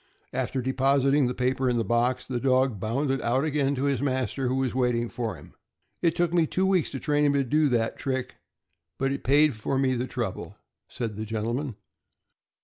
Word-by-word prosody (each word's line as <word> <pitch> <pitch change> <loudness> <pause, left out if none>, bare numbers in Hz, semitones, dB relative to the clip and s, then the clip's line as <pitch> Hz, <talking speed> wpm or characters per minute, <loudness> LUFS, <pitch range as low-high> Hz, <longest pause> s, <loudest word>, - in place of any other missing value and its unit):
After 130 -2 -2
depositing 135 +1 +2
the 125 - -3
paper 130 +1 0
in 120 - +1
the 115 - +1
box, 120 +4 +1
the 125 -2 -3
dog 130 -4 +2
bounded 135 +5 -1
out 130 +3 +1
again 140 -2 +1
to 130 - -2
his 140 -2 +1
master, 130 -1 -1
who 130 - 0
was 135 -1 0
waiting 120 -2 +1
for 115 -3 -3
him. - - -14 0.5
"It 165 -1 +2
took 175 -1 +1
me 170 -2 +3
two 190 +5 +1
weeks 190 -4 +2
to 135 - -5
train 150 0 +1
him 145 -1 +3
to 140 -1 +2
do 150 +4 +2
that 115 -2 0
trick, 130 -2 -3 0.6
but 135 0 0
it 140 - -4
paid 145 +3 +4
me - - -10
for 130 +5 -1
the 130 -2 0
trouble," - - -4 0.3
said 115 -4 -5
the 110 - -4
gentleman. 115 +4 -3
130 Hz, 200 wpm, -26 LUFS, 120-140 Hz, 0.6 s, paid